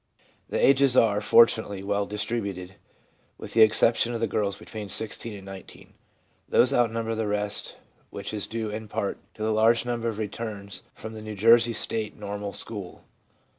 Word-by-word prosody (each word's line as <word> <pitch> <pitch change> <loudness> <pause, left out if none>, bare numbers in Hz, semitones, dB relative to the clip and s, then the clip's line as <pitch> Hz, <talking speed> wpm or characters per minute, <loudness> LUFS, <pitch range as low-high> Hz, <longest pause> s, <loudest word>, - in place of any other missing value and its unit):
The - - -2
ages 135 -1 +4
are, 105 -2 +4
fortunately, 110 -4 +4
well 100 0 -1
distributed, 100 -4 -4 0.6
with - - -9
the 115 - +4
exception 115 +2 +4
of - - -2
the 115 - +1
girls 100 -3 -1
between 105 -2 -8
16 110 +2 -1
and 95 -1 -11
19. 95 -1 -12 0.6
These 125 - +4
outnumber 115 -1 +1
the 110 -1 -2
rest, 105 0 -2 0.3
which - - -7
is 105 -2 -3
due, 110 -2 -4
in 110 +1 -6
part, 100 -1 -3 0.2
to 110 - -6
the 110 0 +1
large 115 +2 +3
number 120 -1 -2
of 110 - -5
returns 105 -2 -5
from 110 0 -9
the 110 - -8
New 110 0 -7
Jersey 115 +3 +5
State 110 0 -2
Normal 105 0 -5
School. 100 -5 -6
110 Hz, 170 wpm, -26 LUFS, 100-115 Hz, 0.6 s, Jersey